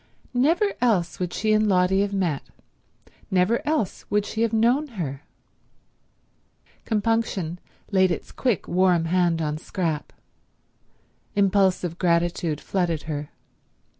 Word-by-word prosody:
Never 330 +11 +2
else 200 -9 +1
would 180 -1 -2
she 215 +3 +1
and 215 0 +3
Lotty 185 +1 +3
have 200 0 0
met; 180 -8 0 0.9
never 190 +5 +2
else 300 - -1
would 205 0 +1
she 220 - -3
have 230 -1 +2
known 240 +7 +2
her. 140 -5 -4 1.6
Compunction 210 -6 -1 0.3
laid 190 -1 +4
its 170 - -4
quick, 245 -7 -1
warm 180 -2 +3
hand 170 -1 +1
on 150 0 -2
Scrap. 165 -4 -3 1.2
Impulsive 190 -3 +2
gratitude 170 -3 +1
flooded 170 -4 -1
her. 150 -2 -4
185 Hz, 115 wpm, -24 LUFS, 170-215 Hz, 1.6 s, laid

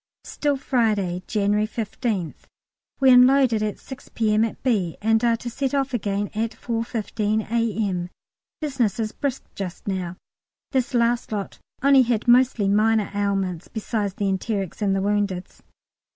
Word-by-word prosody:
Still 290 -2 -1
Friday, 215 -9 0
January 210 0 +1
15th. 215 - -3 0.5
We 265 -1 +6
unloaded 250 -2 +5
at 210 -1 -2
6 265 0 -11
P.M. 215 -1 +2
at 225 - -4
B., 200 -10 0
and 225 +2 +2
are 235 -1 +3
to 240 - -8
start 270 +3 -2
off 275 -1 0
again 205 -3 -1
at 225 +1 -2
4.15 225 -2 -1
A.M.; 210 -6 0 0.5
business 260 -9 0
is 215 -1 -1
brisk 275 -3 -3
just 190 -1 -6
now; 185 -2 -3 0.5
this 260 -2 0
last 235 0 +1
lot 205 -2 -4 0.2
only 275 -1 +6
had 240 -2 0
mostly 240 -4 +4
minor 215 +1 +2
ailments, 195 -4 -1
besides 210 -3 -3
the 205 - -2
enterics 195 0 -2
and 195 -2 +2
the 195 - 0
woundeds. 200 -3 -2
220 Hz, 145 wpm, -23 LUFS, 200-240 Hz, 0.5 s, We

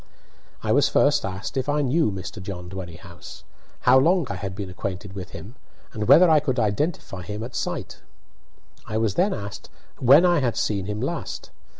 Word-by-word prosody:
I - - 0
was - - +4
first - - +3
asked 95 +7 -5
if 130 +2 -1
I 145 0 +1
knew 140 -2 +2
Mr. 100 +2 -7
John 90 -2 -7
Dwerrihouse, 90 -1 -10 0.4
how 130 +1 +6
long 170 +4 +3
I - - -3
had 95 0 -5
been 100 -1 -5
acquainted 95 +1 -5
with 95 -2 -7
him, 95 +10 -10 0.4
and 105 -2 -3
whether 180 +2 +8
I 160 -2 +5
could 130 -3 -2
identify 110 - -1
him 105 +5 -6
at 120 +2 -7
sight. - - -4 0.9
I 110 - -2
was 110 -3 +1
then 195 - +2
asked 100 - -6 0.3
when 140 +7 +7
I 175 -2 +4
had 125 -4 -1
seen 100 -3 -1
him 105 +1 -3
last. 160 +6 -4
105 Hz, 185 wpm, -24 LUFS, 95-135 Hz, 0.9 s, whether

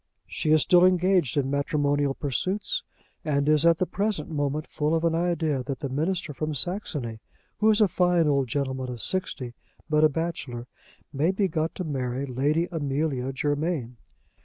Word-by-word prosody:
She 155 - -3
is 155 -1 +5
still 175 -1 +5
engaged 185 -5 +3
in 135 -1 +1
matrimonial 145 -1 +1
pursuits, 190 - -2 0.4
and 140 -2 0
is 155 +1 +5
at 165 -1 +5
the 185 - +1
present 200 -5 -2
moment 145 0 -1
full 150 +2 -1
of 165 - 0
an 165 -1 +2
idea 165 -5 0
that 135 +1 -5
the 140 - -3
minister 160 +4 -1
from 155 +2 -3
Saxony, 145 - -1 0.4
who 220 - +4
is 215 0 +4
a 210 - +6
fine 175 -2 +2
old 140 -3 +2
gentleman 130 -1 -2
of 120 -1 -6
sixty, 130 - -2 0.3
but 150 0 +2
a 155 - +7
bachelor, 140 -6 -4 0.5
may 145 +5 +1
be 195 +1 +1
got 160 -1 -2
to 185 - -3
marry 135 -3 -2
Lady 145 +6 0
Amelia 140 -4 -1
Germain. 145 -3 -2
150 Hz, 170 wpm, -26 LUFS, 140-170 Hz, 0.5 s, a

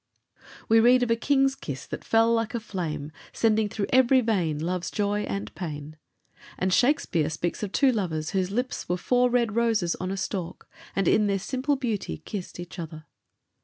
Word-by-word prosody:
We 225 +1 +6
read 245 +2 +5
of 235 - 0
a - - +5
king's 270 +2 +2
kiss 140 - -7
that - - -7
"fell 225 +1 +3
like 230 0 0
a - - 0
flame," 160 -9 -4 0.2
sending 220 -2 +2
through 205 0 -2
every 260 0 +6
vein 185 -10 0
love's 175 +3 -2
joy 205 0 -1
and 100 +1 -4
pain. 155 -3 -6 0.6
And 185 0 0
Shakespeare 200 - +2
speaks 165 +2 -3
of 205 -3 -3
two 275 +3 +4
lovers 165 -9 -2
whose 185 -2 0
lips 245 +1 -3
were 180 - +1
"four 250 +6 +2
red 235 -3 +1
roses 225 -7 +2
on 185 - -4
a 195 - -3
stalk, 185 -3 -4 0.3
and 195 -3 +1
in 210 -1 +4
their 200 -1 +1
simple 260 +8 -1
beauty 220 - -3
kissed 190 - -7
each 175 +1 -8
other." 155 -2 -7
205 Hz, 185 wpm, -26 LUFS, 175-235 Hz, 0.6 s, We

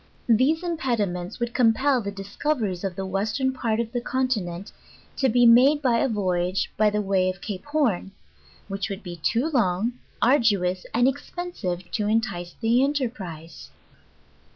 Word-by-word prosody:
These 265 +9 +3
impediments 220 - -2
would 240 0 -2
compel 255 +2 +3
the 200 - -4
discoveries 200 - -2
of 190 -2 -3
the 195 - -4
western 220 +8 -1
part 230 -3 -1
of 230 -1 -2
the 245 -1 -2
continent, 215 -9 -2 0.5
to 265 - +2
be 245 +1 +4
made 255 +6 +6
by 245 -5 +2
a 270 - +1
voyage 185 -3 -1
by 215 0 +4
the 210 0 -1
way 190 -2 +2
of 185 +1 -5
Cape 185 0 -6
Horn, 275 - 0 0.6
which 195 0 -3
would 195 +1 -6
be 175 -2 -7
too 235 - 0
Jong, 230 - 0 0.2
ardous 200 -8 +2
and 245 +2 +3
ex 270 +2 -2
pensive 185 - -4
to 210 -2 -1
entice 200 -6 -1
the 235 +3 +3
enterprise. 200 - -4
220 Hz, 155 wpm, -25 LUFS, 190-255 Hz, 0.6 s, made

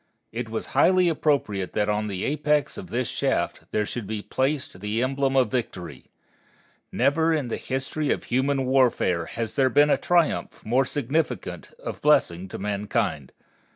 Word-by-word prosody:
It 115 0 -4
was 110 0 -3
highly 180 +5 +5
appropriate 140 - 0
that 105 -1 +1
on 105 0 0
the 95 -2 -3
apex 150 0 +1
of 205 -3 -7
this 125 -4 -1
shaft - - -1
there 105 - 0
should 110 -1 -5
be 105 -1 -4
placed 135 -7 -2
the 105 +4 -1
emblem 135 +1 0
of 125 -5 +3
Victory. 90 - -4 0.9
Never 160 +4 +2
in 150 -6 0
the - - -2
history 135 +3 -2
of - - 0
human 135 +2 0
warfare 125 -10 +2
has 115 -1 -4
there 135 -2 +3
been 145 +4 +4
a - - +4
triumph 175 -3 0
more 125 +5 +2
significant 145 +4 -2
of - - -7
blessing 95 - +3
to - - -7
mankind. 100 - -2
130 Hz, 160 wpm, -25 LUFS, 105-145 Hz, 0.9 s, highly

